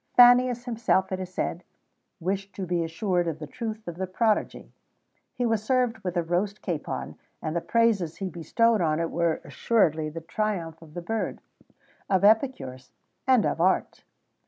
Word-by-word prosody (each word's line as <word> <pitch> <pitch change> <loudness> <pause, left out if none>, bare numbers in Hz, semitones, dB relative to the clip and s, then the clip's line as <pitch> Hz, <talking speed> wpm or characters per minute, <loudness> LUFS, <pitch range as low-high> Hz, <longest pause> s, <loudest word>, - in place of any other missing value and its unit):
Fannius, 245 0 +7
himself, 220 -6 +1
it 185 - -2
is 185 -1 -6
said, 175 -1 -3 0.6
wished 195 +3 -3
to 190 - -3
be 175 -1 0
assured 175 +1 0
of 160 -2 -2
the 155 - -7
truth 220 - -6
of 170 -1 -5
the 190 0 -2
prodigy: 215 +3 0 0.6
he 245 -1 0
was 225 -2 +1
served 245 0 +1
with 180 -3 -3
a 170 - +2
roast 185 +5 -1
capon, 170 -6 -4 0.2
and 155 +1 -4
the 170 - 0
praises 215 -8 +2
he 195 - -4
bestowed 200 +6 +1
on 155 -2 +1
it 165 0 -1
were 170 -1 0
assuredly 160 -9 +1
the 165 +2 -6
triumph 165 -3 -3
of 155 -2 -15
the 175 - -5
bird, 225 +4 -2 0.7
of 190 -1 +2
epicures, 200 - +2 0.4
and 255 -5 +5
of - - 0
art. 185 +2 +1
190 Hz, 170 wpm, -26 LUFS, 165-225 Hz, 0.7 s, Fannius